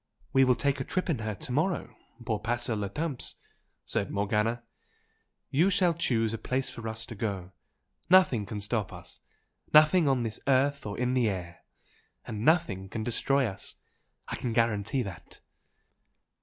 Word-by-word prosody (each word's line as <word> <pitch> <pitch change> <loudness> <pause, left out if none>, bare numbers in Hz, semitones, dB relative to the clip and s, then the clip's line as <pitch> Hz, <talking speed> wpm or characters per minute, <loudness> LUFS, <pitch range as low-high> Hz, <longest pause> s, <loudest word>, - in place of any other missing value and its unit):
"We 135 0 +6
will 125 -1 +4
take 140 +1 0
a - - -1
trip 185 +2 -1
in 135 - -1
her 110 -2 -3
to 110 - -5
morrow 150 -4 0 0.3
pour 110 -2 -1
passer 120 +1 0
le 100 -2 -2
temps" 145 +3 -4 0.5
said - - -1
Morgana, 105 +4 0 0.9
"You 165 +8 +4
shall 180 -3 +3
choose 115 -9 0
a 115 - -3
place 130 +1 -2
for 115 -1 -7
us 110 +1 -4
to 115 - -8
go. 100 -4 -4 0.6
Nothing 170 - +5
can 105 -1 -4
stop 105 0 -1
us - - -10 0.5
nothing 155 +1 +6
on 125 -4 +1 0.2
earth 140 -1 +2
or 100 - -5
in 125 +1 0
the 125 -4 +3
air! 90 -4 -5 0.7
and 105 0 -5
nothing 120 - +2
can 110 - -4
destroy 135 +4 +1
us. 95 -5 -6 0.5
I - - -4
can 120 - -3
guarantee 115 +2 +1
that!" 95 -5 -10
120 Hz, 160 wpm, -29 LUFS, 105-140 Hz, 0.9 s, We